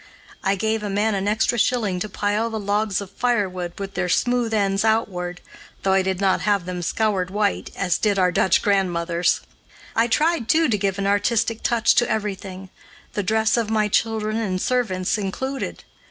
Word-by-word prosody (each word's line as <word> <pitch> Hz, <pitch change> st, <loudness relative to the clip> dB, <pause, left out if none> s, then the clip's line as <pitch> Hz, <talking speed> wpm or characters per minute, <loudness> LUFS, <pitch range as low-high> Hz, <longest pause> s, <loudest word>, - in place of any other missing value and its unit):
I 195 Hz, 0 st, +2 dB
gave 220 Hz, +2 st, -1 dB
a 210 Hz, -, -3 dB
man 210 Hz, +2 st, +1 dB
an 195 Hz, 0 st, -1 dB
extra 225 Hz, +3 st, +1 dB
shilling 215 Hz, -6 st, +1 dB
to 215 Hz, -, -3 dB
pile 205 Hz, +3 st, -1 dB
the 220 Hz, -1 st, -4 dB
logs 205 Hz, -1 st, 0 dB
of 195 Hz, -1 st, -9 dB
firewood 195 Hz, -7 st, -1 dB
with 195 Hz, -1 st, -6 dB
their 180 Hz, 0 st, -1 dB
smooth 245 Hz, +3 st, +1 dB
ends 200 Hz, -2 st, +1 dB
outward, 180 Hz, -6 st, -1 dB, 0.4 s
though 190 Hz, -, +2 dB
I 190 Hz, -, +4 dB
did 190 Hz, -1 st, -2 dB
not 195 Hz, -1 st, +2 dB
have 200 Hz, -4 st, +1 dB
them 180 Hz, -1 st, -4 dB
scoured 190 Hz, 0 st, 0 dB
white, 205 Hz, +1 st, -1 dB
as 180 Hz, -3 st, 0 dB
did 205 Hz, -2 st, +1 dB
our 180 Hz, -1 st, +3 dB
Dutch 185 Hz, +2 st, +2 dB
grandmothers. 175 Hz, -4 st, +1 dB, 0.5 s
I 230 Hz, +1 st, +3 dB
tried, 300 Hz, 0 st, +1 dB
too, 325 Hz, 0 st, +4 dB
to 220 Hz, -, +2 dB
give 195 Hz, -1 st, 0 dB
an 195 Hz, -, -2 dB
artistic 220 Hz, +3 st, +1 dB
touch 235 Hz, -1 st, +3 dB
to 240 Hz, -, +2 dB
everything 195 Hz, -3 st, -4 dB, 0.4 s
the 205 Hz, -, -1 dB
dress 220 Hz, +4 st, +1 dB
of 230 Hz, -2 st, 0 dB
my 215 Hz, -1 st, +2 dB
children 220 Hz, 0 st, 0 dB
and 195 Hz, -5 st, -1 dB
servants 215 Hz, -5 st, 0 dB
included. 265 Hz, +8 st, -4 dB
205 Hz, 185 wpm, -22 LUFS, 190-220 Hz, 0.5 s, I